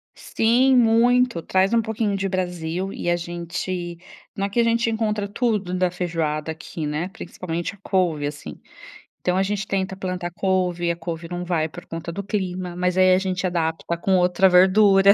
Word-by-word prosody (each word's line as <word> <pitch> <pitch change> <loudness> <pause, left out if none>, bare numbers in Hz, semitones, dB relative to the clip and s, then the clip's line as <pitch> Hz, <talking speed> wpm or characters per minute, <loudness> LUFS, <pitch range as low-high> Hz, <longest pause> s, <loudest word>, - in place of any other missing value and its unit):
Sim, 250 +4 +2
muito. 240 -2 +4
Traz 190 +5 +1
um 230 - +4
pouquinho 220 -2 -1
de 195 0 -1
Brasil 180 0 -3
e - - -3
a 175 - +3
gente 175 +1 -4 0.4
não 195 - -1
é 200 - -3
que 220 - -1
a - - +5
gente 230 +1 +2
encontra 215 -2 -1
tudo 205 -4 -1
da 185 0 +2
feijoada 165 -3 -2
aqui, 160 0 -6
né, 150 +5 -2
principalmente 175 -3 -5
a 205 - -17
couve, 170 -8 0
assim. 145 - -8 0.6
Então 180 0 +1
a 190 - +3
gente 200 0 -2
tenta 190 -1 -2
plantar 185 -2 -4
couve, 180 -2 0
e - - +3
a - - -3
couve 165 0 -6
não 175 0 -4
vai 165 -3 0
por 175 +4 -11
conta 165 +1 -6
do 200 - -4
clima, 185 -3 -3
mas 180 0 0
aí 185 0 +6
a 185 - +5
gente 185 -1 -1
adapta 170 -1 -2
com 190 +2 +2
outra 180 +1 +4
verdura. 195 +2 +6
185 Hz, 190 wpm, -23 LUFS, 175-200 Hz, 0.6 s, aí